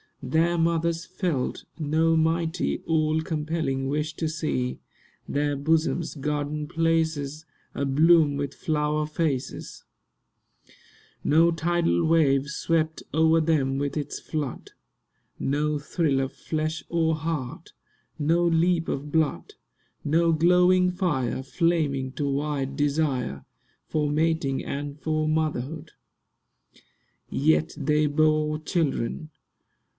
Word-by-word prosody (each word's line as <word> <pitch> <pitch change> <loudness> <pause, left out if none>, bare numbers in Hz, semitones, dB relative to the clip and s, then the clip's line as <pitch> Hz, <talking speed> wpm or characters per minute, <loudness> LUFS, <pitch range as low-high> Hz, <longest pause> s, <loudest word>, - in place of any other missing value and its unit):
Their 165 +2 +2
mothers 165 +1 +1
felt 175 -8 -2
No 160 +2 +2
mighty, 165 +2 0
all 155 -1 +1
compelling 150 -4 -2
wish 150 +2 -2
to 160 - -2
see 155 -5 -2 0.5
Their 145 0 0
bosoms 160 +3 0
garden 150 +1 -2
places 160 -2 0 0.3
Abloom 150 +2 +4
with 140 -1 -3
flower 150 -1 -1
faces; 150 -4 -3 1.4
No 165 +3 +4
tidal 165 - +1
wave 150 -4 +3
swept 160 0 -1
o'er 160 +1 +4
them 145 -4 +1
with 140 -1 -2
its 145 -1 -4
flood; 145 -5 -5 0.7
No 150 +2 0
thrill 145 -1 0
of 135 0 -2
flesh 155 0 -3
or 165 -1 +1
heart; 155 -5 -5 0.4
no 165 +4 +2
leap 170 0 +2
of 145 +2 -3
blood; 160 -2 0 0.5
No 165 +3 +3
glowing 180 +3 +4
fire, 150 - -1
flaming 140 -2 0
to 140 +2 -2
white 140 -1 -2
desire 140 - -1 0.4
For 150 -2 0
mating 155 -2 0
and 145 +1 -5
for 155 0 -1
motherhood: 155 0 -2 1.4
Yet 160 +2 +2
they 150 +1 +2
bore 155 0 +2
children. 155 -2 -2
155 Hz, 105 wpm, -26 LUFS, 145-165 Hz, 1.4 s, Abloom